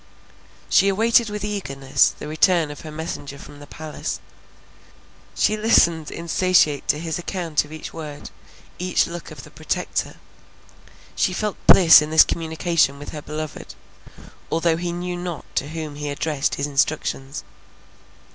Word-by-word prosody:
She 195 - +4
awaited 225 +3 +3
with 210 0 -4
eagerness 135 -10 +1
the - - -7
return 160 0 +2
of 145 - -9
her 155 - -9
messenger 150 -3 -6
from 145 +1 -13
the 145 - -12
palace; 155 0 -6 1.2
she 215 - +2
listened 170 -8 +3
insatiate 170 -3 +1
to - - +2
his 160 +1 -4
account 170 -3 -1
of 145 - -15
each 155 0 -8
word, 150 -3 -8 0.5
each 180 0 +1
look 170 -1 -8
of - - -11
the - - -14
Protector; - - -3 1.0
she 185 - +1
felt 210 +2 -2
bliss 170 -4 +9
in 150 - -3
this 160 0 +7
communication 160 -3 0
with 145 - -9
her 150 - -7
beloved, 155 +1 -7 0.8
although 165 0 +2
he 175 0 -3
knew 175 +1 -4
not 175 -3 -5
to 140 - -1
whom 155 -2 -5
he 145 0 -5
addressed 145 0 -1
his 140 - -2
instructions. 140 -1 -1
160 Hz, 145 wpm, -22 LUFS, 150-175 Hz, 1.2 s, bliss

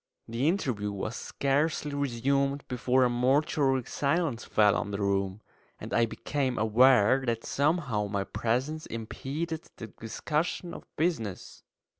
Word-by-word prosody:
The 115 +5 0
interview 125 - 0
was 100 +4 -4
scarcely 145 +1 0
resumed 140 +1 0
before 125 +1 +2
a 125 - +4
mortuary 135 +1 +2
silence 145 -1 0
fell 105 -1 +3
on - - -2
the 100 - -3
room, 100 0 0 0.4
and - - -7
I 115 0 +3
became 130 +1 -2
aware 125 +2 +5
that 115 -1 -1
somehow 140 -8 0
my 100 -1 -1
presence 130 +10 -2
impeded 150 +8 -5
the 115 - -6
discussion 150 - -3
of - - -10
business. 155 - -2
130 Hz, 130 wpm, -29 LUFS, 110-145 Hz, 0.4 s, aware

